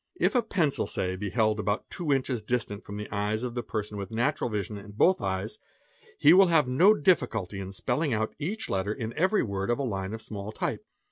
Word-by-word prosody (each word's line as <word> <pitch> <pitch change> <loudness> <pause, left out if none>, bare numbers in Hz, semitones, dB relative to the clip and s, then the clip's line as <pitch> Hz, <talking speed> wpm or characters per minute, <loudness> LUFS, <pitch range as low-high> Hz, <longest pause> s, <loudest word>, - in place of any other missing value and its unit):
"IRfa 240 -3 +2
pencil, 155 -7 +1
say, 95 0 -2
be 100 +2 -4
held 110 0 +1
about 105 0 -1
two 170 -5 -2
inches 130 -3 0
distant 105 -2 -2
from 100 - -7
the 105 - -5
eyes 105 +2 -1
of 125 -1 -4
a 120 - -1
person 105 -2 -4
with 100 -1 -5
natural 120 +4 0
vision 105 -1 -3
in 100 0 -10
both 185 - +3
eyes, 95 +2 -3 0.6
he 150 - +7
will 190 +1 +7
have 160 -5 +4
no 175 +12 +5
difficulty 110 - +1
in 95 0 -6
spelling 135 +9 -1
out 110 -1 -1
| - - -43
each 195 +9 -3
letter 95 +2 -1
in 110 0 -4
every 185 - +2
word 100 -1 -3
of 120 - +2
a 140 - -2
line 100 -4 -3
of 110 - -9
small 105 -1 -6
type. - - -3
110 Hz, 220 wpm, -28 LUFS, 100-145 Hz, 0.6 s, he